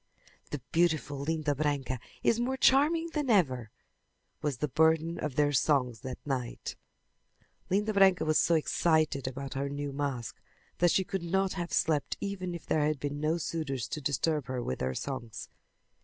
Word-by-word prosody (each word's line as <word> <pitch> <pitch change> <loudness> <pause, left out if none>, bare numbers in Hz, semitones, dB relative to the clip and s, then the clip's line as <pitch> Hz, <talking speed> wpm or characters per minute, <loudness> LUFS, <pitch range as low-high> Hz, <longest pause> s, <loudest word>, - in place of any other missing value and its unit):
"The 150 - -3
beautiful 160 -4 +1
Linda 150 0 0
Branca 140 -3 -1 0.2
is 230 - +3
more 260 +2 0
charming 320 +6 +4
than 295 -4 -1
ever," 130 - +2 0.7
was 145 -4 -1
the 150 - -1
burden 160 +3 +2
of 150 -4 -3
their 145 0 +3
songs 125 -4 +2
that 130 -1 -6
night. 130 -4 -3 0.9
Linda 210 +3 +1
Branca 190 -4 +5
was 155 -1 +3
so 170 - +3
excited 155 -3 +1
about 135 +1 -5
her 140 +1 -2
new 145 0 -4
mask 135 -4 -3 0.4
that 175 - +5
she 190 - +3
could 190 0 -3
not 190 +3 0
have 175 -2 -4
slept 155 -4 +1
even 185 -3 -3
if 170 - -9
there 155 - +1
had 150 -1 +1
been 145 +1 -3
no 155 +3 +1
suitors 145 -8 -3
to 150 - -4
disturb 145 +1 0
her 130 -1 -2
with 65 - -3
their 65 0 -1
songs. 125 - -5
150 Hz, 170 wpm, -30 LUFS, 135-175 Hz, 0.9 s, Branca